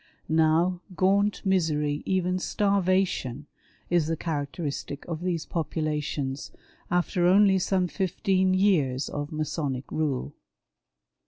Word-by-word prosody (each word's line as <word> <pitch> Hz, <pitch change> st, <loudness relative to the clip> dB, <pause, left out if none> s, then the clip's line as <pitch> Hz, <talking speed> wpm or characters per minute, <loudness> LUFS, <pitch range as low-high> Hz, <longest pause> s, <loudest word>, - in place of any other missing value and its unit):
Now, 165 Hz, +3 st, +3 dB
gaunt 200 Hz, +3 st, +2 dB
misery, 150 Hz, -6 st, +1 dB
even 185 Hz, -1 st, +1 dB
starvation, 185 Hz, -, 0 dB, 0.4 s
is 175 Hz, -3 st, +2 dB
the 165 Hz, 0 st, -1 dB
characteristic 145 Hz, -2 st, -4 dB
of 165 Hz, -2 st, -5 dB
these 175 Hz, -3 st, -2 dB
populations, 150 Hz, -4 st, -2 dB, 0.4 s
after 175 Hz, 0 st, +1 dB
only 195 Hz, +1 st, +5 dB
some 185 Hz, 0 st, +1 dB
fifteen 185 Hz, 0 st, +1 dB
years 150 Hz, -10 st, +2 dB
of 145 Hz, 0 st, -4 dB
Masonic 150 Hz, -4 st, -3 dB
rule. 150 Hz, -5 st, -1 dB
170 Hz, 100 wpm, -27 LUFS, 150-185 Hz, 0.4 s, only